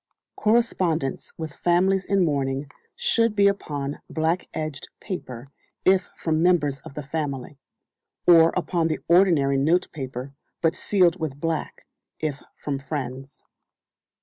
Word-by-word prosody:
Correspondence 185 - +1
with 160 -2 -5
families 185 +3 +2
in 195 -2 +3
mourning 140 -1 -1 0.2
should 230 - +2
be 200 -1 +5
upon 145 -8 -2
black 160 +3 0
edged 155 -3 -5
paper, 135 - -6 0.4
if 190 0 +4
from 160 -1 0
members 155 -6 +2
of 135 - -12
the 150 - -5
family; 140 -2 -4 0.7
or 165 -1 +7
upon 170 -2 0
the 155 - -1
ordinary 165 -6 +4
notepaper, 135 -4 -1 0.3
but 165 0 +1
sealed 185 -2 +2
with 145 -4 -4
black, 165 0 -3 0.3
if 145 -3 -3 0.2
from 140 -2 -2
friends. 135 -1 -6
160 Hz, 120 wpm, -24 LUFS, 140-180 Hz, 0.7 s, or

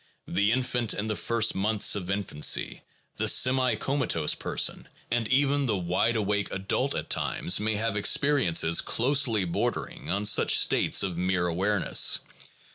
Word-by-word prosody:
The 105 +2 +1
infant 125 -2 -1
in 100 - -3
the 110 -1 -2
first 115 +5 0
months 105 +2 +1
of 95 -3 -5
infancy, 100 -7 -1 0.4
the - - -1
semi 130 -2 +3
comatose 125 - -1
person, - - -2 0.2
and 115 -1 0
even 140 +2 +1
the 105 - 0
wide 90 +6 0
awake 105 -1 -1
adult 95 +1 -2
at - - -5
times, 90 - 0
may 110 +1 -1
have 110 0 -2
experiences 100 - +2
closely 120 -5 0
bordering 85 - -4
on 100 +4 -1
such 105 - +3
states - - +2
of 90 -3 -4
mere 90 -1 0
awareness. 95 +3 +2
105 Hz, 145 wpm, -26 LUFS, 95-120 Hz, 0.4 s, semi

